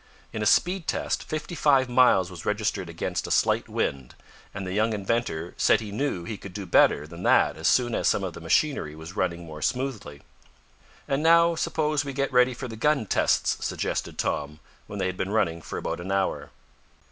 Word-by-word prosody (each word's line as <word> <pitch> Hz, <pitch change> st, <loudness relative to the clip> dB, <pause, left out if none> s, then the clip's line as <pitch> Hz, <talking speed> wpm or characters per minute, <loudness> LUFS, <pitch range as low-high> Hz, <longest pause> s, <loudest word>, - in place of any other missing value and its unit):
In 110 Hz, -, -4 dB
a 105 Hz, -, +1 dB
speed 180 Hz, -1 st, +2 dB
test -, -, -1 dB
fifty 155 Hz, +3 st, -5 dB
five 140 Hz, -5 st, +3 dB
miles 120 Hz, -7 st, +4 dB
was 85 Hz, -3 st, -9 dB
registered 105 Hz, -4 st, -1 dB
against 85 Hz, +1 st, -3 dB
a -, -, -7 dB
slight -, -, +1 dB
wind, 65 Hz, -3 st, -3 dB, 0.4 s
and 95 Hz, -1 st, -6 dB
the 90 Hz, -, -4 dB
young 110 Hz, +2 st, +1 dB
inventor 100 Hz, -5 st, -2 dB
said -, -, +4 dB
he 110 Hz, -2 st, -7 dB
knew 105 Hz, -6 st, -2 dB
he 105 Hz, +5 st, -5 dB
could 100 Hz, -, -10 dB
do 100 Hz, -2 st, -5 dB
better 85 Hz, -, +4 dB
than -, -, -10 dB
that -, -, +3 dB
as -, -, -2 dB
soon 120 Hz, -2 st, +3 dB
as -, -, 0 dB
some 100 Hz, -, +2 dB
of 90 Hz, -3 st, -4 dB
the -, -, -10 dB
machinery 80 Hz, -, 0 dB
was 80 Hz, +4 st, -10 dB
running 85 Hz, -4 st, -2 dB
more 75 Hz, -1 st, -9 dB
smoothly. 120 Hz, -, -3 dB, 0.8 s
"And 135 Hz, +1 st, 0 dB
now 170 Hz, +1 st, +5 dB
suppose 155 Hz, -3 st, 0 dB
we 140 Hz, -1 st, -5 dB
get 140 Hz, 0 st, -2 dB
ready 125 Hz, 0 st, +4 dB
for 130 Hz, +1 st, -6 dB
the 115 Hz, -, -8 dB
gun 140 Hz, +1 st, +1 dB
tests," -, -, +1 dB
suggested -, -, -3 dB
Tom, 75 Hz, +1 st, -2 dB, 0.3 s
when 105 Hz, -, -7 dB
they 95 Hz, -, -1 dB
had 90 Hz, 0 st, -3 dB
been 95 Hz, -, -2 dB
running 85 Hz, -6 st, 0 dB
for -, -, -6 dB
about -, -, -3 dB
an 90 Hz, +2 st, -5 dB
hour. 95 Hz, 0 st, -1 dB
105 Hz, 205 wpm, -26 LUFS, 90-135 Hz, 0.8 s, now